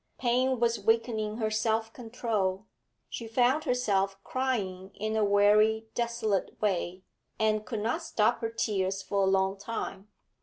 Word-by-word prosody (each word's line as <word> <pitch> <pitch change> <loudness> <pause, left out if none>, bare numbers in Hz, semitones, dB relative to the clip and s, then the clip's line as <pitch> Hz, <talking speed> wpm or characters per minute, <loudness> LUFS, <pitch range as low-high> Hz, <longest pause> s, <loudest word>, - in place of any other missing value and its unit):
Pain 255 +1 +1
was 235 0 +2
weakening 225 -2 0
her 220 -2 -1
self 220 +1 0
control; 220 -5 -2 0.4
she 230 - -6
found 250 +7 +2
herself 200 -7 +1
crying 195 -7 -2
in 215 +1 -2
a 220 - +2
weary, 210 +2 +4
desolate 235 -4 -1
way, 185 -3 -1 0.3
and 215 -1 +1
could 225 -4 -3
not 235 +10 -1
stop 220 -10 +1
her 225 - -2
tears 195 -4 -1
for 200 0 0
a 190 - +3
long 190 0 +1
time. 200 -2 -5
220 Hz, 145 wpm, -29 LUFS, 200-235 Hz, 0.4 s, weary